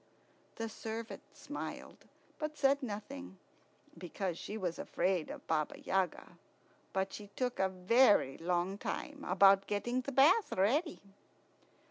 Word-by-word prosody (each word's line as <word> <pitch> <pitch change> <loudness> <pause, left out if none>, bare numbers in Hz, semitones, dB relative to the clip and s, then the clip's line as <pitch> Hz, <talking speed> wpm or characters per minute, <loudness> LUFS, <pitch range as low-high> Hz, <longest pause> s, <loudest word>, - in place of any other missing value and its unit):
The 225 - -3
servant 225 +1 -6
smiled, - - -7 0.3
but 305 0 -4
said 280 0 +3
nothing, 205 - -6 0.6
because 180 +1 -4
she 210 +5 -6
was 180 -5 -3
afraid 185 -4 0
of - - -8
Baba 155 -2 -1
Yaga. 190 -1 -2 0.5
But 190 0 -1
she 210 - -8
took 250 -1 -2
a 190 - +3
very 190 - +4
long 180 +3 -1
time 295 -1 -5
about 195 0 +5
getting 240 +5 -1
the 280 - -5
bath 285 - +5
ready. 275 - +1
205 Hz, 125 wpm, -34 LUFS, 185-250 Hz, 0.6 s, about